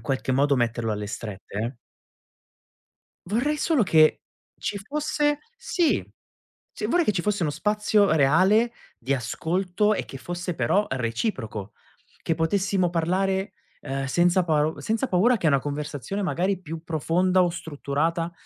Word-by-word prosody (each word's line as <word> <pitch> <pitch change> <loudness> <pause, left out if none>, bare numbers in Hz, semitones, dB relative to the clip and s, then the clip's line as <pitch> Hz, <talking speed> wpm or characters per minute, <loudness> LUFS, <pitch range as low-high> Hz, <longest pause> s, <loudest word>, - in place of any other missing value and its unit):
qualche 135 -1 -2
modo 140 +2 +3
metterlo 115 -2 0
alle 105 0 -4
strette, 105 -2 -7
eh 120 +4 -3 1.5
vorrei 255 +9 +1
solo 305 -4 +2
che 155 -4 +4 0.4
ci 205 - -3
fosse 295 +5 -1 0.2
sì, 360 -8 +1 0.7
sì, - - -3
vorrei 350 -1 +2
che - - +3
ci 180 -3 -1
fosse 205 -1 0
uno 155 - +1
spazio 210 +2 +2
reale 185 - +4 0.3
di 130 +4 -1
ascolto 180 - 0
e - - -3
che 135 - -9
fosse 175 +5 -4
però 205 +5 +1
reciproco, 115 - -3 0.5
che 165 - 0
potessimo 185 +2 +1
parlare, 190 +3 0 0.3
uhm, 135 0 -3
senza 175 +5 +3
pa 155 -1 +1
senza 225 +4 -1
paura 220 +6 +3
che 170 - +2
una 140 -2 +4
conversazione 145 +6 -4
magari 185 +1 0
più 165 -1 -7
profonda 180 +4 +2
o 180 - +3
strutturata, 165 +1 -2
175 Hz, 140 wpm, -25 LUFS, 140-200 Hz, 1.5 s, che